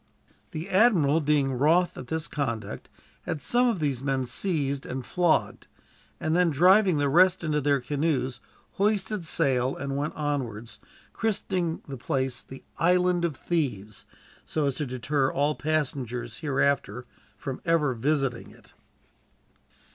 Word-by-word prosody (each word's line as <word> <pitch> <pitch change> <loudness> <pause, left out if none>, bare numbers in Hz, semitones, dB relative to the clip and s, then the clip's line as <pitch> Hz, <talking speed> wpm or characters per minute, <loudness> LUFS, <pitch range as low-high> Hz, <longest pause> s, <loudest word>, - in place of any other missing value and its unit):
The 160 +4 -5
admiral, 185 -8 +4
being 145 -2 +2
wroth 160 +8 +3
at 125 - -8
this 160 +3 -2
conduct, 115 -7 -4 0.4
had 155 - -2
some 245 - +2
of 230 -4 +1
these 140 -5 -1
men 135 -2 -1
seized 140 -1 -1
and 130 -1 -5
flogged; 175 -3 0 0.5
and 160 +1 0
then, 180 -1 +4
driving 180 +4 +5
the 145 0 +1
rest 180 +5 +4
into 150 -2 0
their 140 0 +2
canoes, 135 -2 -1 0.4
hoisted 205 -1 0
sail 130 -5 +1
and 140 0 -4
went 145 +2 -2
onwards, 120 -7 -3 0.3
christening 185 -6 -1
the 135 -2 -6
place 130 +1 -2
the 135 - -12 0.2
"Island 180 0 +3
of 165 -4 0
Thieves," 110 - -3 0.4
so 155 -2 -1
as 140 - +1
to 150 +1 -3
deter 130 +2 0
all 145 +2 +1
passengers, 130 -7 -2
hereafter, 140 -6 0 0.3
from 130 +5 -6
ever 165 -6 +2
visiting 135 0 -1
it. - - -19
145 Hz, 140 wpm, -27 LUFS, 130-170 Hz, 0.5 s, driving